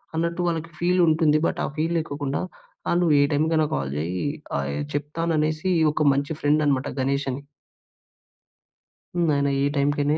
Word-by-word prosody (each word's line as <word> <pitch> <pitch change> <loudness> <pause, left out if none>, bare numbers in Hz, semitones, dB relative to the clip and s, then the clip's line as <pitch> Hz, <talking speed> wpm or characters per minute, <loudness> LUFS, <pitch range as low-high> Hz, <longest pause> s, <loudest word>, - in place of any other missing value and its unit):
అన్నట్టు 170 +2 -1
వాళ్ళకి 165 -1 -2
ఫీల్ 180 +1 +2
ఉంటుంది. 155 -1 +4
బట్ - - -1
ఆ - - -2
ఫీల్ 165 +2 0
లేక 155 -3 -3
కుండా 140 -1 -1 0.5
ఆహ్, 170 - +2
"నువ్వు 165 -3 +3
ఏ - - +5
టైమ్‌కైనా 155 +1 +2
కాల్ 70 -1 -2
చేయి 85 - -2 0.3
ఆహ్, 70 0 -2 0.2
చెప్తాను" 165 +3 -2
అనేసి. 155 +4 0 0.2
ఒక 150 0 0
మంచి 140 +3 -1
ఫ్రెండ్ 150 +1 +3
అనమాట 140 -2 +1
గణేష్ 140 +1 0
అని. 130 +2 -5 1.7
హ్మ్. 170 -2 +2
ఆయన 140 0 +1 0.2
ఈ - - +3
టైంకనే 145 +1 +1
150 Hz, 165 wpm, -24 LUFS, 140-165 Hz, 1.7 s, ఏ